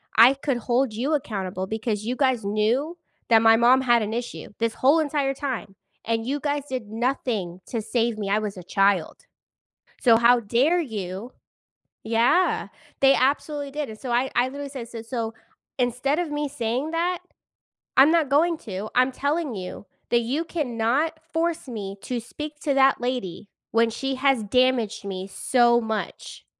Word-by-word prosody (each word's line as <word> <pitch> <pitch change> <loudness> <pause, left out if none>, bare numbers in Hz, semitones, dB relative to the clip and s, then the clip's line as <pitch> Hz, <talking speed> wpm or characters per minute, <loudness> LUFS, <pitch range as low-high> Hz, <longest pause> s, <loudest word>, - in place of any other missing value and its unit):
I 245 +5 +7
could 275 -2 -1
hold 240 0 0
you 265 +8 0
accountable 190 -8 -3
because 215 0 -3
you 245 - -1
guys 260 -6 +1
knew 240 - 0 0.3
that 225 -1 +6
my 225 0 +6
mom 245 +3 +5
had 240 -3 +3
an 215 +1 -3
issue 240 +1 -5
this 230 -1 0
whole 285 +5 +4
entire 290 -3 0
time, 260 -8 -5 0.3
and 225 0 0
you 275 +4 -2
guys 290 -1 -2
did 255 -5 -4
nothing 225 -7 -2
to 230 -3 -3
save 235 +1 0
me. 200 - -3
I 205 - +3
was 210 -2 -3
a 180 - -8
child. 195 -1 +1 0.8
So 230 -3 +6
how 240 +1 +5
dare 260 +11 +2
you?" 210 - -5 0.7
Yeah, 235 +11 +2 0.3
they 270 0 +7
absolutely 285 +2 0
did, 295 0 -4
and 215 -1 -10
so 255 - -5
I 250 +3 +1
I 245 +1 +4
literally 280 +1 -6
said, 250 -4 -7
"So 230 -1 -7
so 230 -2 -4 0.4
instead 250 +4 0
of 340 -3 -2
me 295 0 -1
saying 255 +2 -2
that, 345 +2 -1 0.8
I'm 275 +4 +7
not 325 -5 +3
going 320 +4 +2
to, 205 0 -6
I'm 255 +1 +4
telling 285 -1 -2
you 185 +1 -7 0.2
that 235 - +4
you 270 +8 -1
cannot 285 +1 -1
force 330 -2 -1
me 200 -5 -6
to 245 -2 -3
speak 300 +6 -8
to 290 -4 0
that 270 -1 +4
lady 240 -7 -3 0.2
when 230 0 +3
she 270 +4 -3
has 260 -4 +2
damaged 250 -1 +1
me 190 -1 -5
so 240 +4 +3
much, 220 -1 -5
245 Hz, 170 wpm, -24 LUFS, 220-280 Hz, 0.8 s, I